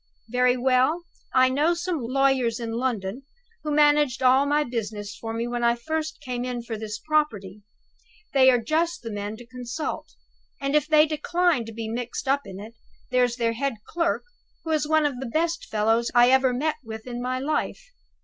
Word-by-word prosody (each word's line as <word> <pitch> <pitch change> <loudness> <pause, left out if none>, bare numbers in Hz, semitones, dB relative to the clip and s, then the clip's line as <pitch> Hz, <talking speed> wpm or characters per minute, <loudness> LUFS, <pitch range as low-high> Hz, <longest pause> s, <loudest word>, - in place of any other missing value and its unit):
Very 250 +1 +3
well, 260 +6 +2 0.3
I 255 0 +5
know 300 +6 +2
some 345 -3 -2
lawyers 255 -1 +1
in 230 -1 -4
London 230 -2 -2 0.4
who 305 - -3
managed 295 -3 +3
all 260 +2 +5
my 295 +1 +2
business 215 -5 -4
for 225 - -6
me 230 +1 -2
when 240 0 -2
I 235 0 +4
first 315 +5 -3
came 250 -3 -4
in 250 -1 -4
for 230 -1 -5
this 215 -1 -5
property; 210 -9 -1 0.7
they 260 -1 +6
are 250 - +5
just 315 +8 -1
the 230 - -5
men 205 +1 -4
to 240 - -12
consult. 250 +5 -5 0.5
And 275 +1 -1
if 300 -1 +3
they 305 0 +6
decline 315 -2 +1
to 225 - -8
be 225 0 -5
mixed 240 +3 -4
up 275 -3 +1
in 190 -1 -8
it, 215 +3 -9 0.4
there's 250 -1 +2
their 230 -2 0
head 275 +2 -2
clerk, 340 0 0 0.4
who 320 - -3
is 305 -1 +1
one 315 0 +3
of 275 -4 -1
the 265 - -4
best 335 +5 -1
fellows 225 +2 +1
I 240 +1 +7
ever 265 -1 +4
met 295 +5 -1
with 220 -1 -8
in 245 -1 -5
my 255 +1 -1
life. 305 - -2
255 Hz, 190 wpm, -25 LUFS, 230-295 Hz, 0.7 s, I